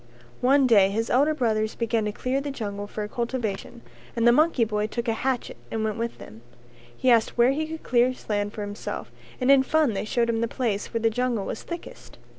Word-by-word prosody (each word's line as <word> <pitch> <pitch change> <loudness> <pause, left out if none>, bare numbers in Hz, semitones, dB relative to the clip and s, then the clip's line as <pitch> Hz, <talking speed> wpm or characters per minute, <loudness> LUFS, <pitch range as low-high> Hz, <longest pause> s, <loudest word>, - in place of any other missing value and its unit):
One 270 +2 +4
day 205 -6 +5
his 225 +3 -2
elder 290 +5 +3
brothers 220 -5 0
began 230 -2 0
to 210 - -1
clear 255 +5 -2
the 285 - -4
jungle 205 -6 -5
for 210 0 -5
cultivation 235 -1 -4 0.3
and 230 0 +2
the - - +8
monkey 295 -2 +3
boy 210 -1 -1
took 235 +2 -4
a 225 - +2
hatchet 255 +2 -2
and 220 -1 -2
went 220 +1 -1
with 230 0 -3
them; 110 +2 -12 0.6
he 255 - +3
asked 230 0 +3
where 240 +2 +5
he 310 +3 -2
could 320 0 -7
clear 245 +1 +3 0.2
land 205 -1 -1
for 215 - -6
himself 205 +1 -6 0.3
and 255 +1 +3
in 275 -1 +7
fun 295 -2 +2
they 200 - -3
showed 235 +2 +1
him 225 0 -1
the 230 - +1
place 225 -5 -2
where 230 - -2
the 225 0 +2
jungle 240 -3 -1
was - - -5
thickest. 340 0 -9
235 Hz, 220 wpm, -25 LUFS, 215-255 Hz, 0.6 s, the